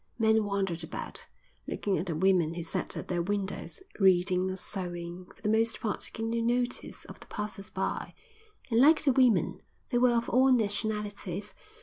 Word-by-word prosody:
Men 220 -2 +3
wandered 195 -4 -1
about, - - -7 0.4
looking 200 -2 -1
at 180 - -4
the 165 - -2
women 170 -2 +3
who 170 - -4
sat 165 - -3
at - - -5
their 175 -2 0
windows, 195 - -3 0.2
reading 185 -1 +4
or 185 - -3
sewing, 180 -2 -4
for - - -23
the - - 0
most 225 +1 +2
part 215 -4 -2
taking 225 0 -4
no 235 - 0
notice 245 +1 -1
of - - -11
the - - -13
passers 210 -1 -5
by; - - -3 0.6
and 225 - +4
like 305 +3 +6
the 275 -3 +4
women 245 -6 +3 0.3
they 245 - +2
were 245 -1 +4
of 235 - -1
all 260 +2 +4
nationalities. 205 -3 -1
205 Hz, 180 wpm, -29 LUFS, 185-230 Hz, 0.6 s, like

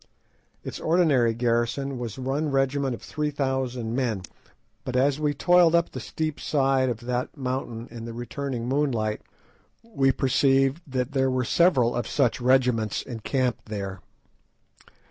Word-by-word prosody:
Its - - -6
ordinary 155 -9 +3
garrison 120 +3 -1
was 115 -4 -5
one 135 +4 -1
regiment 135 -1 +1
of - - -14
three 150 0 -2
thousand 130 -5 -2
men, 115 -8 -1 0.6
but 130 - -4
as 135 +3 +2
we 150 -1 +1
toiled 170 +3 +4
up 170 0 +2
the - - -6
steep 155 -2 -3
side 135 -2 +2
of 115 -2 -4
the 125 +1 -2
mountain 125 -4 -4
in 115 -1 -7
the 115 - -6
returning 120 +1 -4
moonlight 125 -6 0 0.6
we 140 -13 +1
perceived 135 +3 +2
that 130 0 -2
there 135 -1 +1
were 130 -1 0
several 130 -7 +3
of 120 - -2
such 130 -2 +1
regiments 125 -4 +2
encamped 125 +1 -2
there. 100 -3 -5
130 Hz, 145 wpm, -25 LUFS, 120-140 Hz, 0.6 s, toiled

